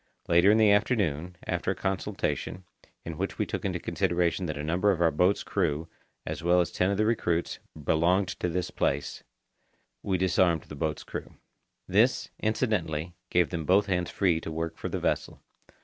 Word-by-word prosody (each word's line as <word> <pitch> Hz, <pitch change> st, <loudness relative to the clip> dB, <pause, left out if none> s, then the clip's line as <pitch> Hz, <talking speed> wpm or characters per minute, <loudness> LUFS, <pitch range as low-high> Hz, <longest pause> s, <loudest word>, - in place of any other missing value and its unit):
Later 85 Hz, +3 st, +5 dB
in 105 Hz, -, +6 dB
the 110 Hz, -2 st, +5 dB
afternoon, 95 Hz, -, +1 dB
after -, -, -2 dB
a -, -, +1 dB
consultation, 95 Hz, 0 st, -2 dB, 0.4 s
in 85 Hz, -1 st, -6 dB
which 95 Hz, -, -2 dB
we -, -, 0 dB
took -, -, -4 dB
into -, -, -1 dB
consideration 90 Hz, +1 st, 0 dB
that 75 Hz, -2 st, -4 dB
a 75 Hz, -, -4 dB
number 90 Hz, +6 st, +1 dB
of 95 Hz, -4 st, +2 dB
our 85 Hz, -1 st, +4 dB
boat's 90 Hz, +6 st, +2 dB
crew, 75 Hz, +3 st, -1 dB, 0.4 s
as -, -, -4 dB
well 90 Hz, +1 st, +4 dB
as 85 Hz, -, +1 dB
ten 90 Hz, -, +1 dB
of 100 Hz, -, 0 dB
the 110 Hz, -, +2 dB
recruits, 85 Hz, -7 st, 0 dB, 0.2 s
belonged 90 Hz, +6 st, +2 dB
to 90 Hz, -, 0 dB
this 90 Hz, +1 st, -2 dB
place, 70 Hz, +1 st, -1 dB, 0.8 s
we 95 Hz, -2 st, 0 dB
disarmed 90 Hz, -3 st, +2 dB
the 75 Hz, -, -10 dB
boat's 80 Hz, +1 st, -2 dB
crew. -, -, -7 dB, 0.5 s
This, -, -, +2 dB
incidently, 90 Hz, -8 st, -1 dB, 0.2 s
gave 90 Hz, -2 st, +2 dB
them 85 Hz, -3 st, -2 dB
both 95 Hz, +6 st, +4 dB
hands 90 Hz, -2 st, -1 dB
free 85 Hz, -5 st, +1 dB
to 80 Hz, -, -6 dB
work 80 Hz, +1 st, -3 dB
for -, -, -5 dB
the -, -, -2 dB
vessel. -, -, -1 dB
90 Hz, 180 wpm, -28 LUFS, 80-95 Hz, 0.8 s, in